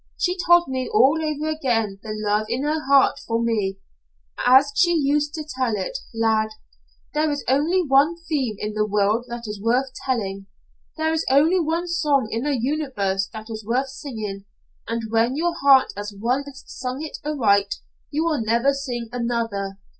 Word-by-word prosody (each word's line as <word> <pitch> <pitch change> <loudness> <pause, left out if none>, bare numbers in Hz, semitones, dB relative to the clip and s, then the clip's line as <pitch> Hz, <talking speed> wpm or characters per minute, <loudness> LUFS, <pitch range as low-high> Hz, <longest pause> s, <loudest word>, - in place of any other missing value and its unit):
She 360 -1 0
told 345 0 +6
me 260 -1 -3
all 265 +9 +4
over 305 0 -2
again 235 -10 -1
the 220 - -7
love 215 0 0
in 245 +4 -1
her 305 +1 -1
heart 275 0 +4
for 230 0 0
me, 215 -5 0 0.7
as 265 +3 +6
she 345 +3 +4
used 295 +1 +1
to 310 -1 -5
tell 255 -6 -1
it. - - -3
Lad! 220 -2 +1 0.6
There 305 +1 +1
is 290 -1 -3
only 310 +8 +2
one 285 +3 +4
theme 265 -9 -1
in 210 +1 -4
the 215 0 0
world 210 +3 +1
that 240 -1 -6
is 210 -2 -6
worth 250 +4 +1
telling. 195 -7 -2 0.5
There 315 0 0
is 320 - 0
only 310 +7 +4
one 335 +2 -1
song 295 -8 +1
in 230 +4 -2
the 290 -2 +1
universe 225 -8 -1
that 220 0 -9
is 220 0 -6
worth 250 +5 0
singing, 215 -8 -6 0.4
and 230 0 -2
when 230 +3 +2
your 340 +3 0
heart 275 -1 +5
has 205 0 -6
once 265 +4 -2
sung 255 +3 -5
it 315 - -7
aright, 205 -9 +2 0.3
you 305 +2 -1
will 320 -6 0
never 235 +5 +2
sing 250 -4 -4
another. 230 -5 -2
255 Hz, 175 wpm, -23 LUFS, 220-295 Hz, 0.7 s, told